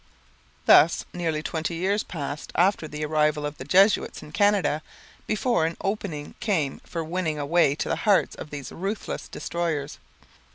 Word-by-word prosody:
Thus 165 - +6
nearly 160 -3 -2
twenty 165 +1 -2
years 195 +5 +1
passed 145 -4 -6
after 180 -2 +2
the 150 0 -4
arrival 150 -1 +1
of 145 0 -5
the - - -5
Jesuits 190 +8 +3
in 150 - -11
Canada 205 -5 +2 0.5
before 215 -6 +1
an 165 - -5
opening 195 -7 -3
came 160 -11 0
for 165 -1 -4
winning 160 -1 -2
a 145 - -2
way 155 -2 +3
to - - -3
the - - 0
hearts 205 -3 +3
of - - -9
these 145 -2 -7
ruthless 195 +5 -4
destroyers. 155 -4 -3
165 Hz, 160 wpm, -25 LUFS, 150-190 Hz, 0.5 s, Thus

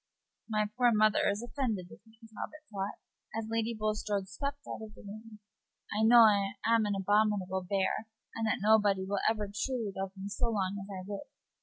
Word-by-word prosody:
"My 215 -1 +2
poor 245 -1 +5
mother 215 -1 +4
is 200 +3 -1
offended 235 -6 -2
with - - -12
me," 220 0 -21 0.2
Talbot 305 +7 -7
thought, 195 0 -3 0.4
as 225 0 -4
Lady 230 0 0
Bulstrode 215 -2 -1
swept 280 +8 -4
out - - -5
of 215 -1 -9
the - - -14
room. 215 +2 -10 0.6
"I 215 - +1
know 235 +2 +8
I 200 -3 +5
am 225 -1 +4
an 205 - 0
abominable 195 -1 +2
bear, 200 +2 0 0.3
and 225 -1 -1
that 215 - +2
nobody 205 -2 +4
will 200 +1 -1
ever 215 -2 -1
truly 225 0 -2
love 195 0 -3
me 190 +1 -5
so 205 +3 -1
long 200 -2 -1
as 195 - -12
I 185 -2 -6
live. 205 +7 -6
215 Hz, 190 wpm, -31 LUFS, 200-225 Hz, 0.6 s, know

